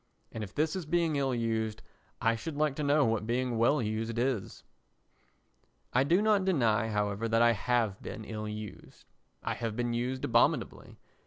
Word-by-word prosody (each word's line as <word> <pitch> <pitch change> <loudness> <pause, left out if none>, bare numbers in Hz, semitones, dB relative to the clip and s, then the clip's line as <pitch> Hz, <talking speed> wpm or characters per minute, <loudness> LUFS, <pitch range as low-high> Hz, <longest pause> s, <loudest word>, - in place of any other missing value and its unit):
And 110 - -5
if 95 - -9
this 155 +3 +1
is 180 -5 -4
being 165 -1 +1
ill 135 -2 0
used 110 -2 -2 0.4
I 115 -2 +2
should 145 +6 -6
like 150 -2 +1
to 150 - -2
know 145 0 +4
what 110 -1 0
being 120 -1 0
well 125 +3 +3
used 110 +2 -2
is. 120 -5 -2 1.3
I 130 - +4
do 175 +8 +3
not 210 -3 +3
deny, 115 - +2
however, 105 0 -1
that 115 +1 +4
I 120 - +6
have 115 -2 0
been 110 - -7
ill 110 -1 -5
used. 105 -1 -8 0.4
I - - -1
have 115 -2 -4
been 120 0 -1
used 125 +2 -2
abominably. - - +1
120 Hz, 175 wpm, -30 LUFS, 110-140 Hz, 1.3 s, I